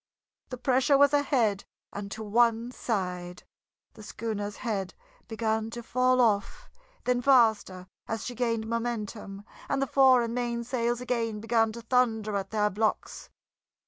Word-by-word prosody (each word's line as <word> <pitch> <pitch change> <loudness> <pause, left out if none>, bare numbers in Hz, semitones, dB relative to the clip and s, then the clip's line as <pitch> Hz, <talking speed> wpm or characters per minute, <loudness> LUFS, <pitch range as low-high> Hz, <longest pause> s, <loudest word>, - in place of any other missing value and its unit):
The 255 - -6
pressure 260 +3 +3
was 285 +1 +5
ahead 245 -8 +1 0.3
and 200 0 -6
to 220 +2 -6
one 230 +2 +2
side; 180 -7 -4 0.5
the 220 - -13
schooner's 210 -1 -5
head 200 -6 -4 0.3
began 220 -1 -1
to 235 +1 -7
fall 255 +2 +2
off, 210 -5 +1 0.4
then 250 -1 +1
faster 220 -8 +3 0.2
as 225 -2 -4
she 250 - -4
gained 230 -2 -1
momentum, 220 -3 -4 0.2
and 275 - 0
the 275 - +1
fore 260 -2 +5
and 230 0 -3
main 240 -1 -2
sails 240 0 -1
again 230 -3 -2
began 225 0 +1
to 235 0 -9
thunder 225 -3 +1
at 195 -1 -3
their 210 -1 +1
blocks. 215 +2 -2
230 Hz, 145 wpm, -28 LUFS, 210-245 Hz, 0.5 s, was